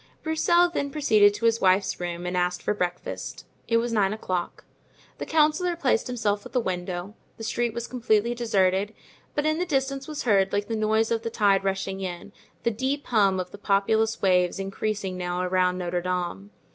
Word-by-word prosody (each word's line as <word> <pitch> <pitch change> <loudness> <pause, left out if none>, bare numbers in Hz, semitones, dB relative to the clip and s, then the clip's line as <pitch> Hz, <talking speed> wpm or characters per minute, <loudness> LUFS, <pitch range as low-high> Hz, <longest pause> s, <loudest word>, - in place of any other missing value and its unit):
Broussel 345 +2 +3
then 295 -5 -2
proceeded 220 -9 +4
to 230 - -3
his 230 0 +3
wife's 190 +1 +2
room 175 0 -4
and 180 +1 -2
asked 180 0 0
for - - +1
breakfast; 180 -3 -4 0.2
it 230 - +3
was 235 0 -1
nine 200 -2 +2
o'clock. 185 -5 -4 0.6
The - - -5
councillor 315 +3 +2
placed 275 -8 +1
himself 215 -5 -1
at - - -12
the 255 - +3
window; 180 -1 -4 0.2
the 225 - -8
street 235 +1 -1
was 235 0 -3
completely 235 -2 +1
deserted, 205 -3 +1 0.4
but 295 - 0
in 310 +1 +1
the - - +1
distance 275 -4 -1
was 305 -2 -4
heard, 195 -5 +3
like 205 0 0
the 225 - -2
noise 220 +1 +1
of 230 -1 +1
the 230 - -3
tide 200 -3 +2
rushing 195 0 -2
in, 180 +1 -6 0.3
the 235 - +2
deep 265 +6 -2
hum 200 -5 +3
of 180 0 -4
the 205 - -11
populous 220 +3 +1
waves 180 -1 +3
increasing 195 -1 -3
now 180 0 -2
around 180 0 +1
Notre 175 -1 -2
Dame. 175 - -3
205 Hz, 190 wpm, -26 LUFS, 185-240 Hz, 0.6 s, proceeded